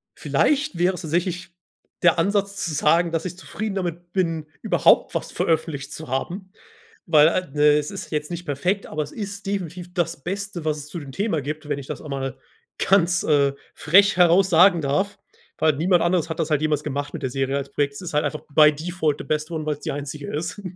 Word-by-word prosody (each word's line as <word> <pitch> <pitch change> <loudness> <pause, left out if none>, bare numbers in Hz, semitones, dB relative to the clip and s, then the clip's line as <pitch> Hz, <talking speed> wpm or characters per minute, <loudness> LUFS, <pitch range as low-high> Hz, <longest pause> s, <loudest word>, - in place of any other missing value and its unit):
vielleicht 290 - +1
wäre 180 +2 +2
es - - -7
tatsächlich 175 +2 -2 0.5
der 175 0 +5
Ansatz 200 +2 0
zu 165 - -2
sagen, 165 +4 +3
dass 165 +1 -2
ich 180 0 -5
zufrieden 210 +2 -5
damit 175 -2 -4
bin, 165 -5 -1
überhaupt - - +3
was - - -3
veröffentlicht 150 -3 -1
zu 160 - -7
haben. 180 +9 -4 0.6
Weil 150 0 +6
a 170 - +1
ne, 150 +1 +4
es 150 0 -3
ist - - -7
jetzt 150 +1 -2
nicht 175 0 -5
perfekt, 180 +8 -1
aber 155 -1 -3
es 145 - -7
ist 200 -1 -6
definitiv 180 -2 -4
das 170 -5 -2
Beste, 195 -1 -4
was 155 -1 0
es 145 - -8
zu 150 +3 -7
dem 140 -2 -9
Thema 195 -2 -1
gibt, 150 +2 -5
wenn 145 -1 -1
ich 140 - -8
das - - -6
einmal 135 -3 -4 0.4
ganz, 180 -2 +3
äh, 140 -2 +3 0.2
frech 195 +5 +4
heraus 180 +2 +5
sagen 175 0 +6
darf. 190 +9 -1 0.4
Weil 155 -1 +3
niemand 175 +3 +3
anderes 170 -1 +1
hat 160 - -4
das 160 -1 -1
halt 150 -2 +2
jemals 150 -2 +1
gemacht 145 0 -3
mit - - -5
der 130 - -1
Serie 135 +1 -1
als 140 0 -4
Projekt. 140 0 -1
Es - - -8
ist 175 - -6
halt 150 - +2
einfach 155 - -3
by 150 +1 +6
default 160 -1 -1
the - - -7
best 155 +1 -2
one, 160 -2 -3
weil's 150 -1 -2
die - - -3
einzige 145 0 -6
ist. 170 +7 -4
165 Hz, 215 wpm, -23 LUFS, 150-180 Hz, 0.6 s, Weil